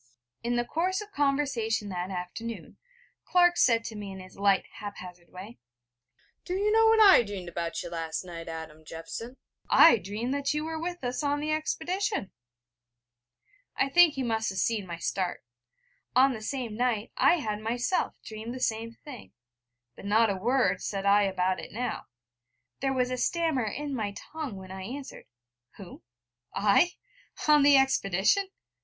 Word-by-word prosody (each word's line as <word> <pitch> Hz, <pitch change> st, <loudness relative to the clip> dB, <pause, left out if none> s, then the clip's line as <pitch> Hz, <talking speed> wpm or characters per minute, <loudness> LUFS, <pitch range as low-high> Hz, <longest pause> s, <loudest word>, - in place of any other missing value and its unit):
In 240 Hz, +1 st, -1 dB
the 240 Hz, 0 st, 0 dB
course 365 Hz, +7 st, -1 dB
of 420 Hz, 0 st, -8 dB
conversation 275 Hz, -, 0 dB
that 180 Hz, 0 st, -4 dB
afternoon, 195 Hz, +5 st, -6 dB, 0.5 s
Clark 350 Hz, -1 st, +4 dB
said 230 Hz, -2 st, +4 dB
to 225 Hz, -, -7 dB
me 205 Hz, -2 st, -6 dB
in 190 Hz, -, -8 dB
his 185 Hz, 0 st, -12 dB
light 200 Hz, -1 st, +2 dB
hap 205 Hz, -1 st, -7 dB
hazard 180 Hz, -1 st, -11 dB
way: 195 Hz, +6 st, -11 dB, 0.8 s
'Do 360 Hz, -, -3 dB
you 410 Hz, +2 st, +1 dB
know 450 Hz, +1 st, +5 dB
what 445 Hz, 0 st, +5 dB
I 400 Hz, -, +8 dB
dreamed 200 Hz, -5 st, -6 dB
about 170 Hz, 0 st, -4 dB
you 175 Hz, -, -6 dB
last 165 Hz, 0 st, -3 dB
night, 170 Hz, -2 st, -8 dB
Adam 160 Hz, -1 st, -8 dB
Jeffson? 165 Hz, +11 st, -8 dB, 0.3 s
I 325 Hz, -7 st, +8 dB
dreamed 210 Hz, +8 st, -3 dB
that 280 Hz, +1 st, -1 dB
you 300 Hz, +1 st, -1 dB
were 320 Hz, 0 st, -4 dB
with 350 Hz, -2 st, -5 dB
us 245 Hz, +3 st, -2 dB
on 290 Hz, 0 st, 0 dB
the 305 Hz, +1 st, -2 dB
expedition.' 345 Hz, -, -2 dB, 1.4 s
I 275 Hz, -, +1 dB
think 340 Hz, +1 st, +6 dB
he 270 Hz, -, -2 dB
must 225 Hz, -2 st, 0 dB
have 190 Hz, -, -6 dB
seen 215 Hz, -3 st, 0 dB
my 170 Hz, -1 st, -5 dB
start: 180 Hz, +1 st, -2 dB, 0.7 s
on 265 Hz, +1 st, +5 dB
the 220 Hz, -, -7 dB
same 235 Hz, -1 st, -4 dB
night 235 Hz, -2 st, -1 dB
I -, -, +5 dB
had 215 Hz, -10 st, -3 dB
myself 240 Hz, -, -1 dB
dreamed 220 Hz, +3 st, -7 dB
the -, -, -6 dB
same 230 Hz, -1 st, -2 dB
thing; 270 Hz, -6 st, -11 dB, 0.6 s
but -, -, -12 dB
not 220 Hz, +1 st, +3 dB
a -, -, -2 dB
word 245 Hz, +7 st, +1 dB
said 195 Hz, -1 st, -3 dB
I 200 Hz, +1 st, +5 dB
about 185 Hz, -1 st, 0 dB
it -, -, -9 dB
now. 245 Hz, +4 st, -4 dB, 0.7 s
There 270 Hz, 0 st, 0 dB
was 255 Hz, -1 st, 0 dB
a 255 Hz, -, -2 dB
stammer 320 Hz, -4 st, 0 dB
in 285 Hz, +7 st, -4 dB
my 210 Hz, -5 st, -3 dB, 0.2 s
tongue 310 Hz, -9 st, -4 dB
when 190 Hz, -1 st, -10 dB
I 190 Hz, 0 st, -7 dB
answered: 265 Hz, +8 st, -8 dB, 0.5 s
'Who? 190 Hz, -4 st, -11 dB, 0.5 s
I? 210 Hz, -, +3 dB, 0.5 s
on 300 Hz, -1 st, +6 dB
the 285 Hz, 0 st, +7 dB
expedition? 270 Hz, -, +2 dB
230 Hz, 170 wpm, -28 LUFS, 195-285 Hz, 1.4 s, I